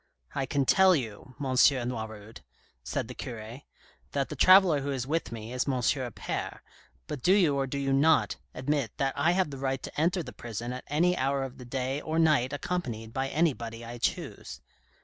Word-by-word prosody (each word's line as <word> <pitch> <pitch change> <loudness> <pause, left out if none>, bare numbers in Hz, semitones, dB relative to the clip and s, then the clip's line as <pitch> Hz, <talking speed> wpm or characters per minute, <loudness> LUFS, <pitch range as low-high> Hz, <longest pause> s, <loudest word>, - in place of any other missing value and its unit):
" - - -30
I 135 -1 -2
can 140 -1 +1
tell 190 +5 +6
you, 125 -1 -5
M. 145 - -3
Noiroud," 120 -5 +1 0.4
said - - -3
the - - -7
cure, 115 +2 -7 0.2
" - - -31
that 140 -1 0
the 150 - -5
traveller 185 -1 +6
who 140 - -3
is 130 -3 -2
with 160 0 -1
me 115 +1 -7
is 125 +2 -1
M. 140 - +1
Appert, 125 -1 -2 0.4
but 135 - -6
do 180 - +4
you 175 -8 +4
or 135 -1 0
do 140 - -4
you 135 -1 0
not 135 - +3 0.2
admit 135 -3 -1
that 135 -1 0
I 160 +5 +3
have 185 -5 +1
the 135 - -7
right 135 -1 -2
to - - -4
enter 175 +2 +1
the 125 - -9
prison 120 +1 -5
at 130 - -7
any 175 +5 +2
hour 135 -1 0
of 135 -1 -7
the 125 - -9
day 130 +3 -2
or 160 0 -3
night 155 -6 +3
accompanied 125 -8 -4
by 135 +1 -1
anybody 120 -8 -1
I 120 +1 -8
choose - - -3
135 Hz, 205 wpm, -29 LUFS, 120-150 Hz, 0.4 s, tell